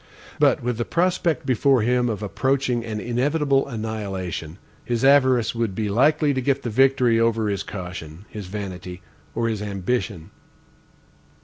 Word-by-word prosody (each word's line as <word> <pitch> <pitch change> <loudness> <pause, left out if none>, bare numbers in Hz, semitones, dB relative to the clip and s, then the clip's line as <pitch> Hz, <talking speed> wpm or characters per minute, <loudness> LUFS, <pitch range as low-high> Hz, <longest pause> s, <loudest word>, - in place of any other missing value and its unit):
But - - +3
with 120 -1 -2
the - - +1
prospect 170 0 0
before 130 -1 +3
him 125 +1 +2
of 110 -1 -3
approaching 130 +2 0
an 110 -2 -4
inevitable 135 +4 +1
annihilation, 100 - -5 0.3
his 120 +1 -1
avarice 130 -4 +4
would 115 -5 -2
be 105 -1 -1
likely 145 +7 +3
to 130 - -1
get 140 +1 0
the 120 - -3
victory 125 -1 +3
over 115 -2 +1
his 100 -1 -1
caution, 90 -3 -8
his 105 -3 -8
vanity, 90 -2 -7 0.3
or 115 0 0
his 110 -2 -2
ambition. 100 -2 -3
115 Hz, 145 wpm, -23 LUFS, 100-130 Hz, 0.3 s, avarice